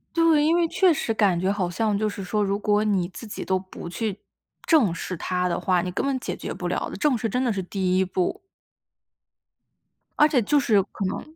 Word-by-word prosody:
对， 325 -3 +4
因 325 +2 +3
为 345 -1 +2
确 365 +1 +3
实 260 - -2
感 200 -5 +2
觉 185 +2 +1
好 195 -3 -1
像 210 +3 0
就 215 +1 0
是 200 -1 -5
说， 210 +3 0
如 200 0 0
果 210 0 +2
你 195 -5 +1
自 210 - -10
己 210 - -6
都 190 - +1
不 185 -2 -9
去 200 +3 -3 0.5
正 265 - +4
视 180 0 -5
它 180 +2 -1
的 170 - -1
话， 180 -2 +1
你 180 - -3
根 180 - -2
本 275 -1 0
解 - - -4
决 - - -5
不 - - -5
了 - - -2
的， - - -7
正 290 -5 +1
视 225 - -2
真 250 +4 -1
的 245 - +1
是 195 -3 -2
第 185 0 -1
一 190 - +3
步。 185 -1 -2 1.8
而 300 - +7
且 280 -5 +2
就 290 +7 +2
是 215 -7 +3
可 200 +1 -6
能， 250 +11 -5
205 Hz, 250 characters per minute, -24 LUFS, 185-250 Hz, 1.8 s, 而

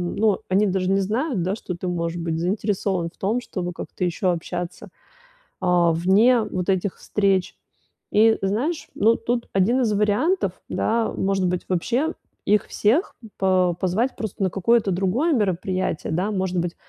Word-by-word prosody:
ну, 210 -2 +2
они 200 +3 +3
даже 185 0 0
не 195 - +3
знают, 225 - -1
да, 185 +4 -1
что 190 - -6
ты, 180 +1 -5
может 170 -1 -2
быть, 165 -1 -2
заинтересован 190 -1 -1
в - - -31
том, 220 +6 0
чтобы 180 -6 -5
как-то 180 - -6
ещё 180 +1 0
общаться, 175 +1 -5 0.7
а, 175 -2 +3
вне 205 +9 +4
вот 185 -4 -3
этих 190 0 0
встреч. 195 -3 0 0.6
И 220 +1 +5
знаешь, 235 - -1
ну, 225 +3 +4
тут 235 +1 -2
1 225 +7 +3
из 220 -3 +1
вариантов, 210 - +1 0.2
да, 230 0 0
может 195 -1 0
быть, 180 0 -2
вообще 245 - 0 0.3
их 210 0 +3
всех 255 - +1 0.2
по 185 -2 +2
позвать 215 +9 0
просто 215 -2 -4
на 190 - +2
какое-то 205 +2 +2
другое 195 - +1
мероприятие, 185 - -1
да, 185 +6 0
может 185 -2 -1
быть, 170 0 -2
195 Hz, 160 wpm, -23 LUFS, 180-220 Hz, 0.7 s, И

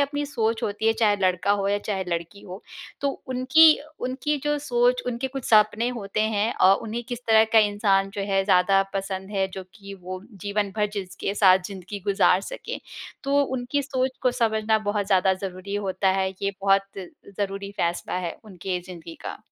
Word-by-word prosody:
अपनी 290 +1 0
सोच 225 -5 -1
होती 210 +2 -2
है, 225 - +5
चाहे 215 -2 +2
लड़का 185 +1 +1
हो 200 -1 +1
या 205 0 +1
चाहे 200 -2 -3
लड़की 170 +3 -4
हो, 185 +2 -10 0.4
तो 280 - +1 0.2
उनकी 260 +6 +6 0.3
उनकी 260 +4 -1
जो 295 0 +1
सोच, 250 -2 +1
उनके 250 +2 -2
कुछ 265 - -4
सपने 215 +2 +4
होते 200 +1 -3
हैं 210 +3 +1
अ, 185 - +5
उन्हें 230 +2 -4
किस 245 -2 -4
तरह 220 -1 +6
का 225 - +7
इंसान 205 -2 +2
जो - - 0
है 195 0 +3
ज़्यादा 195 0 +4
पसंद 195 0 -4
है 190 0 +2
जो 190 - -6
कि 200 -2 -10
वो 185 +1 -6 0.2
जीवन 200 -1 -1
भर 210 -1 +2
जिसके 195 0 -4
साथ 190 -3 +6
ज़िन्दगी 200 +1 -8
गुज़ार 195 -2 +4
सके। - - -6 0.5
तो 280 +1 +3
उनकी 260 +1 -2
सोच 260 -1 -2
को 255 - +3
समझना 220 -3 +1
बहुत 205 -1 -2
ज़्यादा 190 -1 +3
ज़रूरी 185 +1 -6
होता 195 -1 0
है, 190 0 +1
ये 200 - +1
बहुत 195 0 +4 0.6
ज़रूरी 200 0 -3
फैसला 170 -2 -2
है 175 -2 -4
उनके 185 -2 -4
ज़िन्दगी 170 -3 -9
का। - - -5
205 Hz, 185 wpm, -24 LUFS, 195-235 Hz, 0.6 s, का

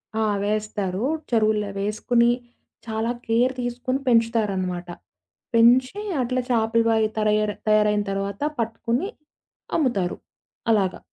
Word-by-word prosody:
ఆ! 220 - +1 0.2
వేస్తారు. 210 -1 -2 0.3
చెరువులవేసుకొని, 215 +1 +1 0.6
చాలా 220 +2 -1
కేర్ 240 +3 +2
తీసుకొని 245 +2 -2
పెంచుతారనమాట. 205 -7 +1 0.7
పెంచి, 255 - +4 0.2
అట్లా 255 +1 0
చేపల 230 -1 +2
వాయ 220 -1 +3
తరయర్ 215 -1 +1
తయారైన 210 -1 +3
తర్వాత 200 +3 -3 0.2
పట్టుకొని, 230 - -1 0.7
అమ్ముతారు. 240 - 0 0.6
అలాగా. 195 -4 +1
220 Hz, 90 wpm, -24 LUFS, 210-235 Hz, 0.7 s, పెంచి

